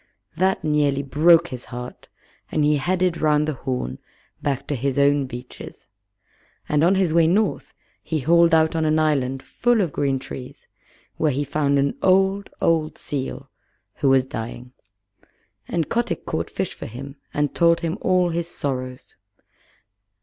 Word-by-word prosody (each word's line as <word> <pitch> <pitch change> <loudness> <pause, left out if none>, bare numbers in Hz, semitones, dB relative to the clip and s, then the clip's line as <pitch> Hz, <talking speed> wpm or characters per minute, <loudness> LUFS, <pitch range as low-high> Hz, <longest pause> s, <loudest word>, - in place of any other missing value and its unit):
That 190 +2 +1
nearly 145 -2 +1
broke 165 +5 +4
his 125 -4 -7
heart, 125 0 -8 0.4
and 155 - +1
he 150 0 +3
headed 180 +4 0
round 150 -1 +3
the 155 - -1
Horn 125 - -4 0.4
back 140 -3 -2
to 145 - -2
his 135 +2 -2
own 140 -1 +3
beaches; 125 0 -10 0.8
and 150 0 +2
on 180 +3 +4
his 185 -4 +1
way 165 -1 +5
north 205 +6 0 0.3
he 155 -3 -2
hauled 170 +4 +4
out 160 0 +3
on 160 - +1
an 155 0 +2
island 135 -4 0
full 240 -1 +1
of 180 -7 0
green 135 -2 0
trees, 130 -1 -9 0.5
where 155 - +2
he 140 +2 -1
found 140 0 +1
an 140 0 0
old, 195 +1 +2
old 155 -2 +1
seal 135 -2 -5 0.5
who 140 - +2
was 135 -1 +4
dying, 120 0 -7 1.0
and 165 -3 -1
Kotick 235 +1 -2
caught - - -3
fish - - -3
for - - -8
him 135 +5 -9
and 145 -1 -1
told 170 -1 +3
him 165 -1 -3
all 180 -1 +2
his 170 0 -2
sorrows. 130 -5 -5
150 Hz, 155 wpm, -22 LUFS, 135-170 Hz, 1.0 s, way